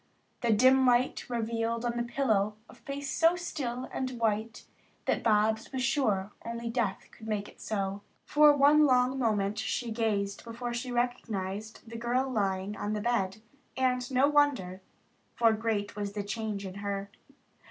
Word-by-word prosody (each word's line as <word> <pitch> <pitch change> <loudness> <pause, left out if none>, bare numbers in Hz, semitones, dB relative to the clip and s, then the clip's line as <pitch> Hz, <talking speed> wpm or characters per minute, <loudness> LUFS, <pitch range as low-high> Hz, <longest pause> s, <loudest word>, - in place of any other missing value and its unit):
The 235 - +2
dim 260 +5 +5
light 245 +1 +2
revealed 230 0 -1
on 240 0 -1
the 240 - 0
pillow 220 -4 +1
a - - -15
face 280 0 -6
so 330 +5 +3
still 265 -8 -4
and 260 - -2
white 225 0 -1 0.4
that - - +1
Bobs 220 0 +2
was 260 -2 -2
sure 215 -7 +1
only 235 0 -4
death 225 -5 -2
could 220 - -12
make 210 -2 -2
it - - -16
so. 200 -2 -2 0.2
For 300 0 +6
one 290 +1 +5
long 255 0 +3
moment 210 -3 0
she 225 +2 -2
gazed 205 -3 -1
before 240 +1 -5
she 240 +1 -4
recognized 220 -4 -3
the 230 +1 -7
girl 245 +3 0
lying 200 -4 -1
on 205 +1 -3
the 210 - -2
bed, 215 -3 -1 0.3
and 250 -1 +1
no 265 +1 +4
wonder, 280 -11 +2 0.5
for 230 -1 +4
great 215 -2 -2
was 205 -1 -4
the 205 -1 -3
change 210 -1 -4
in 185 - -6
her. 200 0 -3
230 Hz, 165 wpm, -30 LUFS, 205-250 Hz, 0.5 s, For